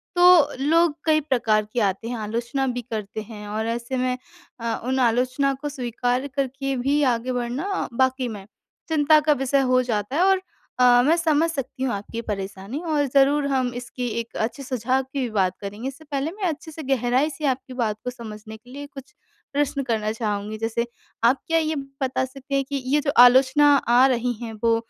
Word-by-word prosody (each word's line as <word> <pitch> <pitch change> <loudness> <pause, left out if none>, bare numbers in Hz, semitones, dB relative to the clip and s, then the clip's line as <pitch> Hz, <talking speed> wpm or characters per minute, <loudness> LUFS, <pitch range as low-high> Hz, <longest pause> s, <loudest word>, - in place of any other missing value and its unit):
तो 355 -4 +7 0.2
लोग 325 0 +3
कई 310 -1 +3
प्रकार 225 -7 +1
के 245 - 0
आते 195 +4 -6
हैं 245 - -3
आलोचना 235 +5 -2
भी 245 -1 -2
करते 220 -2 -5
हैं 210 -1 -9
और 220 +2 -3
ऐसे 235 +3 -3
में 255 0 0 0.4
अ, 230 -1 -2
उन 260 +1 0
आलोचना 255 +3 +2
को 295 - -3
स्वीकार 245 0 -2
करके 270 0 -2
भी 280 +4 +1
आगे 245 +3 -4
बढ़ना 250 +11 -2
वाक़ई 260 -1 +2
में 205 -4 -7 0.4
चिंता 310 0 +5
का 300 0 +3
विषय 270 +1 +1
हो 255 - +5
जाता 225 +2 -2
है 340 - +2
और 385 -1 +4 0.4
अ, 245 -1 +6
मैं 325 +3 +4
समझ 325 -1 +2
सकती 270 -3 -4
हूँ 255 - 0
आपकी 210 +3 -5
परेशानी 200 +4 -5
और 300 -3 +1
ज़रूर 280 +1 +4
हम 255 -3 0
इसकी 245 0 -5
एक 230 - -7
अच्छे 275 +4 -7
सुझाव 255 +1 0
की 265 +2 -6
भी 245 - -1
बात 185 -2 +2
करेंगे। 205 +6 -5
इससे 275 +3 -8
पहले 280 +3 -1
मैं 400 +1 -9
अच्छे 320 0 -5
से 315 0 -8
गहराई 260 +2 +1
से 300 +1 -6
आपकी 260 -1 -2
बात 225 -4 -1
को 250 - -2
समझने 220 -2 -9
के 245 +3 -21
लिए 285 +1 -7
कुछ 270 -2 -12 0.4
प्रश्न 280 -1 0
करना 220 -3 -1
चाहूँगी। 215 -1 -3
जैसे, 225 +1 -1 0.4
आप 250 +4 +4
क्या 330 0 +2
ये 315 0 -1
बता 275 -2 -2
सकते 275 +1 -6
हैं 275 - +2
कि 280 -2 -2
ये 290 +3 +2
जो 280 -1 0
आलोचना 265 +4 +6
आ 245 +1 +4
रहीं 245 -1 0
हैं 230 -2 -5
वो 230 0 +4
255 Hz, 200 wpm, -23 LUFS, 230-280 Hz, 0.4 s, तो